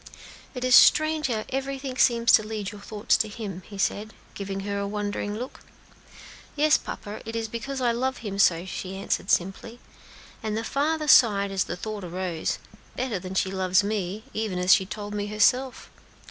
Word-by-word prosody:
"It 250 - -4
is 255 - +2
strange 310 +3 +6
how 220 -4 -2
everything 270 0 -3
seems 235 -2 +4
to - - +7
lead 215 -2 -5
your 205 -1 -11
thoughts 210 0 0
to 220 - 0
Him," 205 -4 -6
he 200 - -10
said, 210 +2 -1 0.2
giving 195 -1 -5
her 200 0 -3
a 200 - -2
wondering 205 0 -3
look. 250 +3 -7 1.0
"Yes, 300 +1 +4
papa, 205 +1 -5
it 225 +1 -7
is 225 -1 -2
because 255 +4 -5
I 240 -1 +3
love 255 +2 -1
Him 200 -3 -5
so," 170 -2 +4
she 190 0 -6
answered, 195 -1 -2
simply; 195 +6 -1 0.6
and 215 -1 -2
the 225 - -2
father 305 +5 -1
sighed 205 -7 +5
as 195 -1 0
the - - -4
thought 215 +1 -5
arose, 175 -2 -3 0.4
"Better 240 -7 -2
than 185 +1 -7
she 190 0 +1
loves 190 +1 +2
me, 205 0 -3
even 215 -4 -2
as 180 +1 +5
she 190 - +2
told 205 0 -6
me 205 0 -2
herself. 250 +5 +1
210 Hz, 185 wpm, -26 LUFS, 195-240 Hz, 1.0 s, to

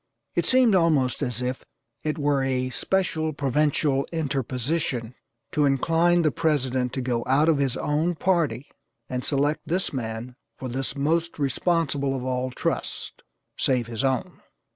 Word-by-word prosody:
It - - 0
seemed 255 -4 +5
almost 155 -9 +2
as 125 -3 -1
if 125 +1 -3 0.4
it 155 +1 -2
were 145 -2 +2
a 130 -1 0
special 160 +1 0
Provincial 140 0 +1
interposition 135 -4 -2 0.4
to 150 - +2
incline 165 +5 +3
the 155 - +3
President 130 -6 0
to 130 - -2
go 120 -2 -1
out 140 +4 +4
of 160 -3 +3
his 135 -3 0
own 155 +4 0
party 165 -6 0 0.4
and 125 0 -2
select 145 +2 +1
this 180 +1 0
man 120 0 -4 0.2
for 130 - -5
this 130 +1 -3
most 165 +4 0
responsible 140 -1 0
of 130 - -4
all 130 0 -1
trusts, 125 - -3 0.5
save 125 -3 +2
his 115 +2 -4
own. 130 -3 -1
140 Hz, 145 wpm, -25 LUFS, 130-160 Hz, 0.5 s, seemed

